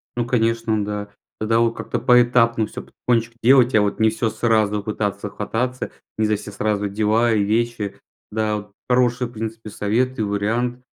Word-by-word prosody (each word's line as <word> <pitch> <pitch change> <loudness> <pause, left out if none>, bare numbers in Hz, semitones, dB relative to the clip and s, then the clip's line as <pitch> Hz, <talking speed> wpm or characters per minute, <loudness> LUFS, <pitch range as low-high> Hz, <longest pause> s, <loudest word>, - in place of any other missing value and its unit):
Ну 120 -1 -1
конечно, 115 -2 +1
да. 105 0 -4 0.3
Тогда 115 +1 +2
от 115 0 +2
как-то - - -3
поэтапно 120 -2 +4
всё - - -8
потихонечку 115 -1 -1
делать. 130 0 +5
А 110 - +6
вот 100 +1 -1
не 110 0 +5
всё 110 +1 -1
сразу 110 -3 +1
пытаться 105 -1 -3
хвататься, 120 +5 -3 0.3
не 110 - +2
за 105 0 +2
все 105 - -7
сразу 105 0 -1
дела 110 +3 +2
и 105 -2 +2
вещи, 110 0 -1 0.3
да. 105 0 0
Вот 105 0 -9 0.2
хорошие, 125 0 +2
в - - -15
принципе, 110 -1 -6
советы 115 +4 -1
и - - +1
вариант. 115 +5 -1
110 Hz, 175 wpm, -21 LUFS, 105-120 Hz, 0.3 s, А